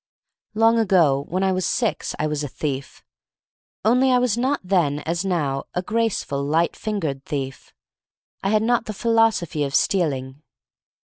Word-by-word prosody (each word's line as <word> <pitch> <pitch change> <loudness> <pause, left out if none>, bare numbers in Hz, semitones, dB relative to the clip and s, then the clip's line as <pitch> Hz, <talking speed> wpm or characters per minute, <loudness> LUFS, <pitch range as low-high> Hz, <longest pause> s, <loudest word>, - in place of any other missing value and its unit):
Long 225 +1 +4
ago, 165 -10 +3
when 185 +3 -1
I 190 - +2
was 185 0 -1
six, 230 +3 -1
I - - -1
was 150 -1 -2
a - - -2
thief 140 0 -5 0.4
— - - -30
only 250 +4 +4
I 250 - +5
was 245 -4 +1
not 260 +4 0
then, 170 -6 +1
as 165 +4 -2
now, 150 -8 -1
a 180 - -1
graceful, 215 -10 -1
light 160 +4 +1
fingered 160 -11 -3
thief 135 -2 -5 0.4
— - - -49
I 195 - +1
had 215 +1 +2
not 240 0 +1
the 215 - -3
philosophy 225 -9 +2
of 140 0 -2
stealing. 140 -7 0
180 Hz, 165 wpm, -22 LUFS, 145-225 Hz, 0.4 s, I